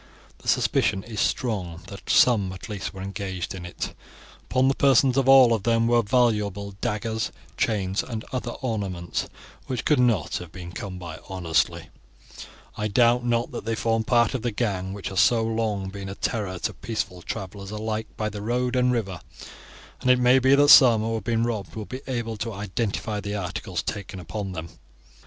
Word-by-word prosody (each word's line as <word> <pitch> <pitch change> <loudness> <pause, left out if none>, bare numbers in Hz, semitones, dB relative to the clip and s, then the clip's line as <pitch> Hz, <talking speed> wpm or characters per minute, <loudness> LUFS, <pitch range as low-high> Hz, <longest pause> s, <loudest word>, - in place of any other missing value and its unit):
The - - -14
suspicion 95 - +2
is 110 -2 -6
strong 90 -9 -1
that 100 - -10
some 105 -7 +4
at 95 - -9
least 105 -3 -4
were 95 -1 -8
engaged 95 -2 -4
in 90 -2 -7
it. 85 - -5 0.5
Upon 130 +1 +2
the 135 - +4
persons 135 -1 +4
of 135 -1 +2
all 130 -3 +8
of 110 - 0
them 115 +2 +2
were 120 0 +4
valuable 105 -4 +1
daggers, 110 +1 -2 0.2
chains, 100 -3 0
and 115 -3 -6
other 125 -1 -2
ornaments, 95 -8 -2 0.4
which 125 -3 -3
could 150 -4 +3
not 115 -9 +2
have 90 -3 -9
been 90 -1 -8
come 95 -1 -6
by 85 -3 -8
honestly, 85 -4 0
and - - -16 0.3
I 105 - -1
doubt 120 +3 +3
not 120 -1 0
that - - -5
they 115 0 0
form 115 +1 0
part 120 0 +3
of 130 - -2
the 120 - 0
gang 100 -4 -2
which 100 0 -5
has 95 - -1
so 115 -2 +4
long 110 -4 -1
been 100 0 -7
a 95 - -6
terror 100 -6 -2
to - - -2
peaceful 90 -5 -4
travelers 100 0 -6
alike 110 +1 -3
by 110 -1 -1
the 105 -1 -7
road 125 +3 0
and 125 0 +3
river, 100 -7 -2 0.8
and 130 - -1
it 125 - +6
may 125 +1 +5
be 130 +2 +5
that 145 +1 +5
some 120 -7 +9
who 115 +1 -1
have 110 - -3
been 115 -1 +1
robbed 110 -5 -3
will 110 -1 -5
be 130 +4 -7
able 115 -4 -3
to 115 +2 -3
identify 105 +1 -2
the 100 0 -4
articles 90 -3 -3
taken 100 -2 -5
upon 95 +2 -5
them. 85 -1 -6
110 Hz, 190 wpm, -25 LUFS, 95-120 Hz, 0.8 s, some